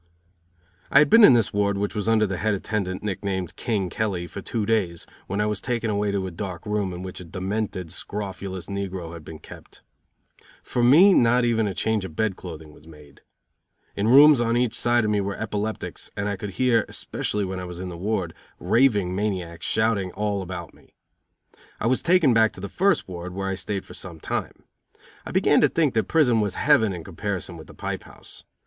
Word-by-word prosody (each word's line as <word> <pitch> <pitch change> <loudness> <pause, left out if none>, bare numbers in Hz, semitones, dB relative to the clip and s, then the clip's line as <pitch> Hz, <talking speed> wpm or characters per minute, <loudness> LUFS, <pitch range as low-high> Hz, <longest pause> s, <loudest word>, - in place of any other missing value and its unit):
I - - +4
had 150 +5 +6
been 230 0 +8
in 140 - +9
this 115 -3 +2
ward, 100 -1 +1
which 100 +1 -2
was 105 +1 -1
under 110 -1 +4
the 95 -2 -3
Head 110 +2 0
Attendant, 95 -2 -3
nick 100 -3 -3
named 95 -3 -3
"King" 105 -6 -1
Kelly, 95 -2 -2
for 100 +3 -8
two 110 +1 -2
days, 100 -7 0 0.2
when 100 - -3
I 105 - +2
was 105 -1 -2
taken 115 -3 -1
away 105 0 0
to 100 -1 -1
a 95 - -5
dark 90 +2 -6
room 105 -3 -1
in 90 +1 -7
which 95 -1 -7
a - - -8
demented, 95 0 -4
scrofulous 95 -1 -5
negro 95 -4 -5
had 85 -2 -9
been 80 +1 -9
kept. - - -14 0.8
For 120 - -1
me 165 +11 +7
not 120 -2 +4
even 115 -2 +1
a 95 - -4
change 110 -2 0
of 80 -5 -8
bed 110 -1 0
clothing 80 -4 -10
was 75 - -18
made. 75 -3 -16 0.7
In 100 +2 0
rooms 140 +2 +8
on 115 0 +1
each 120 -2 +1
side 120 -1 +2
of 105 - +1
me 105 -1 +1
were 100 0 -3
epileptics 110 0 -4
and 100 0 -1
I 100 - -1
could 105 +1 -6
hear, 120 -4 +3
especially 105 -1 -2
when 95 0 -4
I 90 - -5
was 90 -1 -8
in 90 0 -5
the 85 - -7
ward, 95 -2 -2 0.2
raving 105 -8 +2
maniacs 90 -5 -3
shouting 110 -4 +1
all 105 -1 -1
about 85 -3 -7
me. - - -24 0.8
I - - -3
was 125 +2 +2
taken 170 -7 +4
back 110 -1 +4
to - - -10
the 100 - -5
first 200 +1 +1
ward, 90 0 -7
where 95 0 -2
I - - -1
stayed 100 +1 -4
for - - -12
some 85 -4 -7
time. - - -4 0.6
I - - -6
began - - +3
to - - +5
think 155 -5 +1
that 110 - +1
prison 125 -9 +3
was 100 -2 -2
heaven 140 -8 +3
in 90 -3 -6
comparison 95 0 -4
with 80 - -11
the - - -14
pipe - - -5
house. - - -11
100 Hz, 215 wpm, -24 LUFS, 90-110 Hz, 0.8 s, in